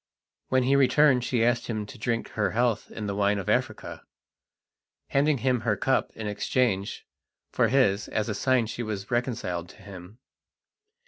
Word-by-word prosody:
When 130 0 +2
he 135 +2 +3
returned 135 -1 +4
she 120 -2 +1
asked 120 0 +1
him 110 -3 -3
to - - -12
drink 115 +1 -2
her 105 -3 -1
health 120 -1 0
in 105 - -6
the 100 - -2
wine 100 +1 +1
of 100 - -5
Africa, - - -1 1.1
handing 145 +1 +2
him 125 0 +1
her 110 -3 0
cup 130 +5 +1
in 110 - -6
exchange 105 -1 -1 0.5
for - - +2
his 105 -7 +2
as 105 -1 -2
a 110 - -1
sign 125 +3 +2
she 115 +2 -5
was 105 -3 -5
reconciled 110 -8 -2
to 95 - -16
him. 95 +1 -11
115 Hz, 170 wpm, -26 LUFS, 105-125 Hz, 1.1 s, returned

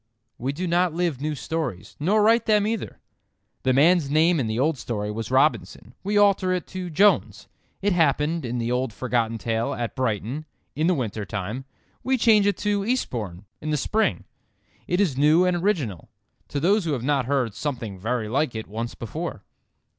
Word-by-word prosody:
We 130 +3 -1
do 170 +6 -4
not 175 -1 +1
live 170 -6 -1
new 150 0 -1
stories—nor 155 - -1
write 230 +2 +4
them 210 -2 +4
either. 220 0 -3 0.6
The 130 - +2
man's 150 +3 +4
name 160 +3 +3
in 125 - 0
the 110 +1 -2
old 145 +2 +1
story 105 -3 -3
was 110 0 -5
Robinson, 120 - +1
we 205 +2 0
alter 200 -2 +4
it 180 - -2
to 185 -1 -5
Jones. 200 +6 +2 0.4
It 205 -1 +3
happened, 165 -1 +2
in 125 0 -3
the 120 0 -1
old 125 -2 -1
forgotten 115 -1 -1
tale, 115 +1 -1
at 120 -1 -4
Brighton, 125 +4 -2 0.3
in 155 +2 +1
the 180 - +3
winter 110 -6 -3
time; 105 +6 -5 0.4
we 260 0 +2
change 215 -4 +5
it 205 - +1
to 205 -1 0
Eastbourne, 110 - -2 0.2
in 155 - -4
the 150 - +1
spring. 215 +10 0 0.6
It 180 - 0
is 170 -10 +1
new 155 +5 +5
and 180 -1 +2
original—to 145 - -4
those 195 +5 +2
who 155 - 0
have 125 -4 -3
not 135 -2 +1
heard 130 -6 0
"something 115 -5 -4
very 115 +2 -2
like 130 +2 0
it" 110 - -4
once 115 +3 -5
before. 150 - -5
145 Hz, 180 wpm, -24 LUFS, 115-180 Hz, 0.6 s, change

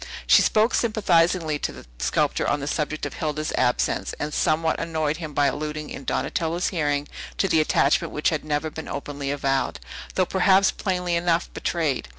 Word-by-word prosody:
She - - +7
spoke 220 +3 +3
sympathizingly 175 -8 +2
to - - -2
the - - -12
sculptor - - 0
on 145 - +1
the 140 - -4
subject 150 +1 -2
of - - -5
Hilda's 155 -1 -3
absence, 125 -1 0
and 150 0 -3
somewhat 160 +1 +1
annoyed 160 -2 -1
him 160 -3 -6
by 145 - +3
alluding 150 +1 -3
in 135 - -7
Donatello's 170 +1 -1
hearing 145 -4 -1 0.3
to - - +2
an 160 - +4
attachment 150 -2 +2
which 150 - +1
had 155 -3 -2
never 155 +1 -2
been 160 - -7
openly 140 0 -5
avowed, 135 -1 -1 0.4
though 185 - +3
perhaps 190 +2 +4
plainly 180 -3 -2
enough 170 0 0
betrayed. 155 - -1
155 Hz, 170 wpm, -24 LUFS, 145-170 Hz, 0.4 s, She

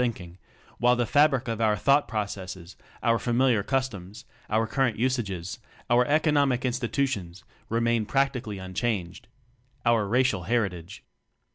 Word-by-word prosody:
TECHNOCRACY 95 -7 -4 0.4
11 120 0 +3
fabric 140 -1 +3
of 115 -1 -3
our 110 -1 +3
thought 140 +7 +3
processes, 95 -4 -5 0.3
our 115 -1 +3
familiar 120 -2 +2
customs, 105 -6 -3 0.2
our 110 +1 +2
current 120 0 0
usages, 105 -8 -2 0.3
our 125 +1 +4
economic 145 -4 +2
institutions 120 - -2 0.3
remain 115 -1 +1
prac 135 +2 +2
tically 110 -6 -6
unchanged 95 -1 -3 0.6
our 115 -3 +3
racial 115 -5 +1
heritage. 95 -5 -2
115 Hz, 120 wpm, -26 LUFS, 100-130 Hz, 0.6 s, our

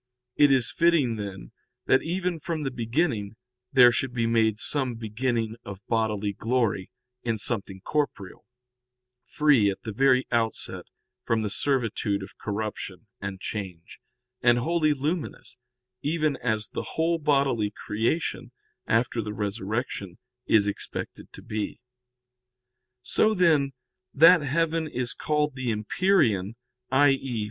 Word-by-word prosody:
It 145 -1 +5
was 130 -3 +3
fitting, 160 -9 +2
then, 95 - -7 0.3
that 130 - +4
even 175 0 -2
from 160 0 -3
the 135 - -2
beginning, 115 -3 -1 0.4
there 125 -3 +7
should 125 +1 -1
be 115 -1 +1
made 110 -2 +2
some 130 +1 0
beginning 115 0 -2
of 100 0 -9
bodily 105 -3 0
glory 115 -4 -1 0.3
in 115 -2 -1
something 100 -4 -2
corporeal, 140 -8 -3 0.8
free 140 -9 +3
at 95 - -5
the 110 - -5
very 130 +2 +3
outset 115 -2 -1 0.4
from 110 -1 0
the 105 - -2
servitude 115 -7 0
of - - -11
corruption 105 -1 -5
and 100 -1 -5
change, 95 -6 -6 0.4
and 120 0 +5
wholly 155 +3 +1
luminous, 150 +2 -4 0.4
even 155 -1 0
as 110 -3 -1
the - - -6
whole 165 +1 +1
bodily 140 -8 +2
creation, 110 +9 -2 0.4
after 115 +1 +1
the 105 0 -5
Resurrection, 100 -2 -3 0.3
is 105 -2 +4
expected 100 - -5
to - - -12
be. 105 -1 -4 1.2
So, 215 +12 +2
then, 155 -7 +3 0.4
that 165 +4 +8
heaven 160 +3 0
is 125 -4 -3
called 150 -1 0
the 130 -2 -3
empyrean, 110 - +1 0.3
i.e. 135 -2 +2
120 Hz, 125 wpm, -26 LUFS, 105-145 Hz, 1.2 s, that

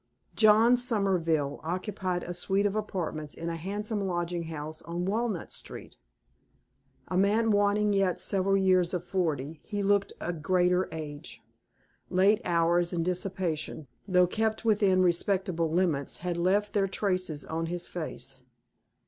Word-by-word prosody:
John 225 +3 +6
Somerville 180 - 0
occupied 185 +1 -2
a 175 - -5
suite 190 +3 0
of 205 0 0
apartments 165 -8 -3
in 170 +1 -4
a 165 - -3
handsome 205 +5 -3
lodging 175 -1 -2
house 155 0 -6
on 170 +1 -4
Walnut 215 -2 -2
Street. - - -6 1.1
A 185 - -2
man 210 +4 +3
wanting 205 0 +2
yet 195 -2 +1
several 195 0 +1
years 185 -2 +3
of 175 0 -4
forty, 155 -5 -2
he 205 -1 -3
looked 200 0 +2
a 175 - -3
greater 180 +3 +1
age. 150 -1 -8 0.7
Late 195 +4 +3
hours 170 +1 +2
and 165 -1 -1
dissipation, 180 -4 -2 0.2
though 180 -2 +5
kept 220 +4 -1
within 200 -4 +4
respectable 175 -2 +1
limits, 165 -6 0
had 180 0 -3
left 195 +4 +1
their 195 -2 +2
traces 185 -6 -2
on 165 +1 -3
his 175 +1 -2
face. 135 -6 -6
180 Hz, 140 wpm, -29 LUFS, 170-200 Hz, 1.1 s, John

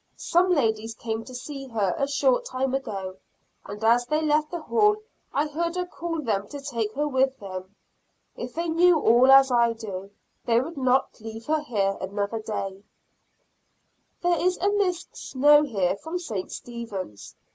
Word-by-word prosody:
Some 355 +2 +2
ladies 225 -7 +1
came 220 0 -4
to 255 - -10
see 275 +1 -7
her 210 -7 0
a 275 - 0
short - - +2
time 260 - -2
ago, 195 -8 -4 0.5
and 210 +2 -7
as 240 +2 +4
they 305 +2 +1
left 305 0 +2
the 345 -3 -5
hall 420 +2 +3 0.4
I 290 - +1
heard 335 +3 -2
her 360 0 -1
call 335 -2 -4
them 205 -4 -1
to 285 - -7
take 235 -6 -3
her 295 +2 0
with 265 -1 +1
them. 190 0 -8 0.6
If 245 0 -7
they 335 +1 -1
knew 335 0 +4
all 245 +1 +5
as 270 -1 +7
I 235 -1 +4
do, 195 -4 -7 0.3
they 230 0 +3
would 320 +7 -4
not 260 -3 +1
leave 225 +1 -8
her 310 0 +1
here 200 -8 0
another 200 +3 -2
day. 195 -3 -4 1.4
There 350 0 +2
is 365 0 +2
a 400 +3 +1
Miss 380 -4 0
Snow 295 +3 +4
here 200 -11 0
from 320 - -5
St. 220 - -5
Stephens. 210 - -7
255 Hz, 170 wpm, -25 LUFS, 220-310 Hz, 1.4 s, as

